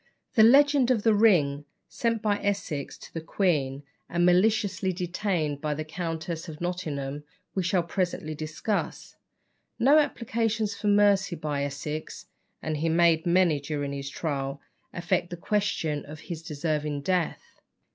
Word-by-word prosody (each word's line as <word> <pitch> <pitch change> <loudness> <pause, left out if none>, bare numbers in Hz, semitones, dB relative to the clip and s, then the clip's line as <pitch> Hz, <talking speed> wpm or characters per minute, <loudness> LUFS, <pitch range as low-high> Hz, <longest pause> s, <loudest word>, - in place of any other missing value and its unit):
The 225 - +5
legend 275 +2 +6
of 235 -5 +2
the 225 - +5
ring 160 -10 +3 0.2
sent 230 -2 -1
by 205 -1 +1
Essex 195 -8 -2
to - - -13
the 165 - -4
queen, 150 -6 0 0.3
and 175 0 +2
maliciously 190 +1 +2
detained 175 -5 -2
by 150 -1 -1
the 155 +1 -4
Countess 165 +1 -4
of 155 -1 -9
Nottingham, 150 -5 -3 0.3
we 190 - 0
shall 180 0 +1
presently 170 -3 -2
discuss. 155 +7 -3 0.6
No 275 +6 +6
applications 225 -6 0
for 210 - -4
mercy 200 -2 +4
by 150 -3 -2
Essex 150 +2 -5 0.4
(and 155 -1 -2
he 165 +2 0
made 165 0 +3
many 170 -4 +3
during 145 -1 -3
his 140 0 -5
trial) 140 -2 -3 0.3
affect 175 0 -1
the 175 - -6
question 170 -6 -1
of 150 +1 -9
his 165 0 -6
deserving 150 -2 -2
death. 180 +2 -2
170 Hz, 145 wpm, -27 LUFS, 150-205 Hz, 0.6 s, legend